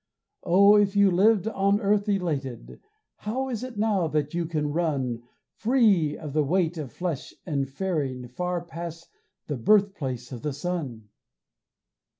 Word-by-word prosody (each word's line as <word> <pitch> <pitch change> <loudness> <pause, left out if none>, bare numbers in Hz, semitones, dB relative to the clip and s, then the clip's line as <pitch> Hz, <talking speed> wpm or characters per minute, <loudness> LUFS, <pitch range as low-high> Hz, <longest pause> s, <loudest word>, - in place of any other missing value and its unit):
Oh, 200 +4 +6
if 205 -1 +2
you 200 -1 +5
lived 205 +3 +4
on 200 -1 +2
earth 205 0 +1
elated, 145 - -2 0.4
How 260 +5 -3
is 240 -2 -3
it 255 -4 -7
now 205 -5 +1
that 150 -1 -1
you 170 -1 -1
can 150 -3 -2
run 135 -8 -1 0.3
Free 215 - +2
of 150 -4 -7
the 155 0 +2
weight 175 +3 +1
of 140 -5 -6
flesh 175 -7 -4
and 140 -5 -1
faring 140 -6 -2
Far 180 +5 -3
past 170 0 -8 0.4
the 145 - -3
birthplace 140 - +1
of 120 -3 -7
the 150 +2 -2
sun? 135 - -4
175 Hz, 150 wpm, -26 LUFS, 145-200 Hz, 0.4 s, Oh